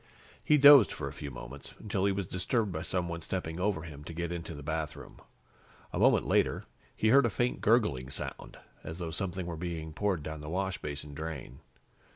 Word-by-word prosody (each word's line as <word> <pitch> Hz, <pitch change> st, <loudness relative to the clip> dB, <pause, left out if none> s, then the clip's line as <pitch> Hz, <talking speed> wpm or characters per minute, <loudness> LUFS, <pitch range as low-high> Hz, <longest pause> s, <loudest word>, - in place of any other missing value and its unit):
He 150 Hz, -, +5 dB
dozed 140 Hz, -5 st, +9 dB
for -, -, -4 dB
a -, -, -6 dB
few 70 Hz, -, -6 dB
moments, 65 Hz, +2 st, -9 dB
until 100 Hz, -2 st, -1 dB
he 100 Hz, -, +3 dB
was 95 Hz, -1 st, -2 dB
disturbed 100 Hz, +5 st, 0 dB
by 80 Hz, -2 st, -3 dB
someone 85 Hz, -1 st, -1 dB
stepping 80 Hz, 0 st, -4 dB
over 95 Hz, -4 st, 0 dB
him 75 Hz, -3 st, -9 dB
to 85 Hz, -, -7 dB
get 85 Hz, 0 st, -3 dB
into 85 Hz, -2 st, -5 dB
the 75 Hz, -, -9 dB
bathroom. 80 Hz, +1 st, -5 dB, 0.7 s
A -, -, -2 dB
moment -, -, +4 dB
later, -, -, +1 dB, 0.3 s
he 110 Hz, -, +2 dB
heard 135 Hz, +1 st, +6 dB
a -, -, 0 dB
faint 120 Hz, +3 st, -1 dB
gurgling 105 Hz, -, +2 dB
sound, 70 Hz, -, -4 dB, 0.3 s
as 80 Hz, -, -6 dB
though 85 Hz, -3 st, -4 dB
something 95 Hz, +1 st, -3 dB
were 85 Hz, -1 st, -4 dB
being 80 Hz, -2 st, -5 dB
poured 95 Hz, -4 st, 0 dB
down 80 Hz, 0 st, -6 dB
the 75 Hz, -, -7 dB
washbasin 75 Hz, -6 st, -3 dB
drain. 70 Hz, -4 st, -6 dB
85 Hz, 190 wpm, -31 LUFS, 80-95 Hz, 0.7 s, dozed